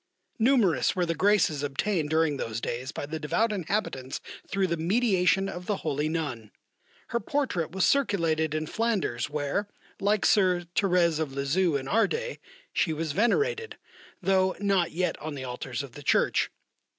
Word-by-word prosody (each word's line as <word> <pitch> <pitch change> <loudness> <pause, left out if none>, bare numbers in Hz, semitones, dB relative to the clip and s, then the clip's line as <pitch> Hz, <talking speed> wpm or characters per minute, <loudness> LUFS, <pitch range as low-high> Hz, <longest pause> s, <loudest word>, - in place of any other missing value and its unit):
Numerous 225 - +3
were 180 -2 +1
the 165 - 0
graces 170 -4 +2
obtained 150 +3 -1
during 160 -2 +2
those 115 -3 -3
days 125 +3 -4
by 145 - -5
the 160 +2 -5
devout 215 +9 +1
inhabitants 180 -9 -2 0.3
through 195 0 0
the 170 -2 0
mediation 190 +1 +2
of 180 -2 -7
the 210 - +1
holy 150 0 0
nun. 145 -10 -3 0.6
Her 235 - 0
portrait 230 - -1
was 190 +2 +1
circulated 165 - +1
in 155 0 -1
Flanders 195 - -1
where 150 +7 -1 0.3
[like 205 +1 +2
Soeur 185 -3 +4
Thérèse 175 -5 +3
of 150 -4 -2
Lisieux 145 +5 +1
in 135 -1 -2
our 225 +8 +3
day] 485 +1 -4 0.3
she 160 - +1
was 155 0 -2
venerated, 440 - +1 0.5
though 190 0 +3
not 195 -4 +2
yet 180 +2 -1
on 155 -1 -5
the 135 - -6
Altars 125 +1 -4
of 140 - -9
the 145 - -11
Church. - - +2
170 Hz, 160 wpm, -27 LUFS, 150-205 Hz, 0.6 s, Soeur